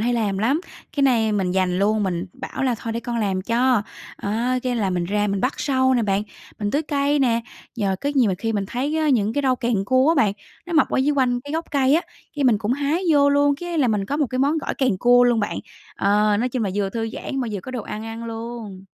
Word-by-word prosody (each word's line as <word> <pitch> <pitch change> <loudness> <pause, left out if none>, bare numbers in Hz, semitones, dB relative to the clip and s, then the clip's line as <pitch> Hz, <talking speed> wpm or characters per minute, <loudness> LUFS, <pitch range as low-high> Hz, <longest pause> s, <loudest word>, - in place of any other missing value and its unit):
hay 240 +3 +1
làm 210 -5 0
lắm, 260 +10 +1 0.4
cái 285 - +2
nay 230 -5 +3
mình 190 -3 0
giành 185 -1 +1
luôn, 210 +2 +2
mình 180 -1 -2
bảo - - -6
là 255 -3 +2
"Thôi 230 - -4
để 230 - -3
con 240 0 -4
làm 195 -4 -1
cho." 240 +1 +2 0.3
Á, 235 +5 -1
cái 250 -1 -1
là 205 -4 0
mình 175 -1 -1
ra 205 +3 0
mình 200 -1 -1
bắt 255 +6 0
sâu 260 -2 +2
nè 240 - +2
bạn, 200 -1 +1 0.4
mình 205 -1 -1
tưới 290 +6 +1
cây 285 -1 +1
nè, 240 -4 +2 0.4
nhờ 195 -4 0
có 285 - -1
nhiều 250 -6 +4
mà - - 0
khi 225 +2 -2
mình 205 -2 -1
thấy 270 +9 -2
á 310 -1 +1
những 220 -6 +2
cái 285 +3 -1
rau 260 -1 +2
càng 235 -6 0
cua 260 +6 +3
á 330 - +4
bạn, 220 -10 +3 0.3
nó 350 - -6
mọc 315 - +4
ở - - 0
dưới 275 +3 +2
quanh 245 -2 +2
cái 285 +3 -8
gốc 325 +1 -1
cây 275 -1 +3
á, 335 - +2 0.3
cái 285 - 0
mình 235 -5 +4
cũng 215 +2 -1
hái 290 +6 0
vô 285 -1 +5
luôn, 285 0 +3
cái 345 -1 -3
là 265 -5 +3
mình 210 -3 0
có 280 +9 -2
một 295 -2 +1
cái 255 +1 -4
món 285 +4 +2
gỏi - - -3
càng 250 -8 0
cua 245 +3 +5
luôn 240 -2 +3
bạn. 205 - -2 0.4
Ờ, 205 +1 +3
nói 240 +4 0
chung 250 -1 -2
là 195 - -1
vừa 200 -1 -1
thư 225 0 -3
giãn 270 - -4
mà 245 - -2
vừa 200 - -3
có 255 - -8
đồ 250 -3 -4
ăn 215 +2 -6
ăn 225 +1 -6
luôn. 225 -4 -7
235 Hz, 270 wpm, -22 LUFS, 205-270 Hz, 0.4 s, vô